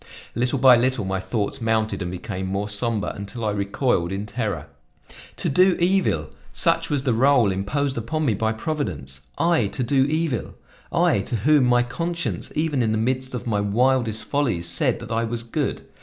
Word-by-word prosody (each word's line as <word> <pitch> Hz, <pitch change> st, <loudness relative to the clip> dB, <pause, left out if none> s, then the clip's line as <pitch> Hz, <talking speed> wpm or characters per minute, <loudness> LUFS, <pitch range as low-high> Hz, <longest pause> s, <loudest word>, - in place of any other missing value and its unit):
Little 125 Hz, +4 st, 0 dB
by 130 Hz, -1 st, +7 dB
little, 125 Hz, -3 st, +1 dB
my 95 Hz, 0 st, -1 dB
thoughts 105 Hz, +6 st, -3 dB
mounted 110 Hz, -2 st, 0 dB
and 90 Hz, -, -2 dB
became 95 Hz, +1 st, -5 dB
more 100 Hz, +2 st, -2 dB
somber 105 Hz, +1 st, -1 dB
until 105 Hz, +3 st, -6 dB
I 105 Hz, -, +1 dB
recoiled 100 Hz, -2 st, 0 dB
in 100 Hz, +2 st, -3 dB
terror. 105 Hz, -, -3 dB, 0.7 s
"To -, -, -1 dB
do 185 Hz, +6 st, +4 dB
evil! 175 Hz, -, +1 dB, 0.2 s
Such -, -, +1 dB
was 145 Hz, -3 st, 0 dB
the 130 Hz, -4 st, +1 dB
role 125 Hz, -3 st, +4 dB
imposed 130 Hz, +8 st, -1 dB
upon 155 Hz, +7 st, -2 dB
me 120 Hz, -, +2 dB
by 110 Hz, +2 st, 0 dB
Providence! 95 Hz, -, -4 dB, 0.2 s
I, 165 Hz, -10 st, +2 dB
to 125 Hz, -, -3 dB
do 135 Hz, +2 st, +3 dB
evil! 155 Hz, -5 st, -1 dB, 0.4 s
I, -, -, +3 dB
to 100 Hz, +5 st, -3 dB
whom 135 Hz, +4 st, +4 dB
my 120 Hz, 0 st, +4 dB
conscience, 170 Hz, +7 st, -3 dB
even 150 Hz, -4 st, 0 dB
in 110 Hz, -2 st, +1 dB
the -, -, +1 dB
midst 130 Hz, +3 st, -1 dB
of 125 Hz, -, -5 dB
my 105 Hz, -3 st, 0 dB
wildest 110 Hz, +1 st, +1 dB
follies, 115 Hz, -10 st, -1 dB
said 85 Hz, 0 st, +1 dB
that -, -, -8 dB
I 115 Hz, +1 st, +1 dB
was 115 Hz, 0 st, -3 dB
good! 115 Hz, -, -3 dB
115 Hz, 185 wpm, -23 LUFS, 100-135 Hz, 0.7 s, by